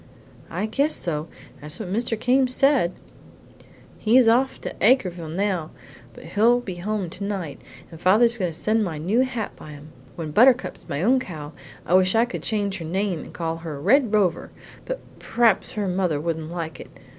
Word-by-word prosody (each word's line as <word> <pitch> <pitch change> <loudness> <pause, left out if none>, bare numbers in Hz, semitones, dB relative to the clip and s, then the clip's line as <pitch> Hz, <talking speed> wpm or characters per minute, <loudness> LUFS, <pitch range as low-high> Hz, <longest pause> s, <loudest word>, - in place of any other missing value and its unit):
"I 185 +5 -2
guess 280 +8 0
so. 155 -2 -3 0.3
That's 150 +1 -8
what 190 -4 -4
Mr. 230 0 -1
Came 260 +2 +3
said. 255 -7 +3 1.1
He's 235 +2 +4
off 255 +4 +3
to - - -5
Acreville 180 - +2
now, 180 -2 -1 0.5
but - - -12
he'll 235 +4 +3
be 190 -7 -7
home 200 +1 -2
tonight, 185 -4 -5 0.3
and 165 0 -12
father's 230 +5 +4
going 180 -3 0
to 160 - -10
send 220 +3 +1
my 170 -6 -3
new 185 +10 0
hat 245 -5 -1
by 150 - -11
him. 145 +1 -12 0.3
When 160 -3 -5
Buttercup's 250 - +3
my 140 +4 -2
own 255 +5 +4
cow 155 -10 -7 0.3
I - - -1
wish 185 +2 +4
I 225 +1 +4
could 245 - -6
change 200 -3 -2
her 165 - -6
name 185 +1 -1
and - - -10
call 165 -1 -3
her 160 -4 -7
Red 230 - +3
Rover, 205 -5 +1 0.4
but - - -4 0.2
p'r'aps 230 -5 +2
her 210 -2 -2
mother 180 -5 0
wouldn't 160 0 -3
like 165 -2 -5
it. - - -10
195 Hz, 180 wpm, -23 LUFS, 165-230 Hz, 1.1 s, He's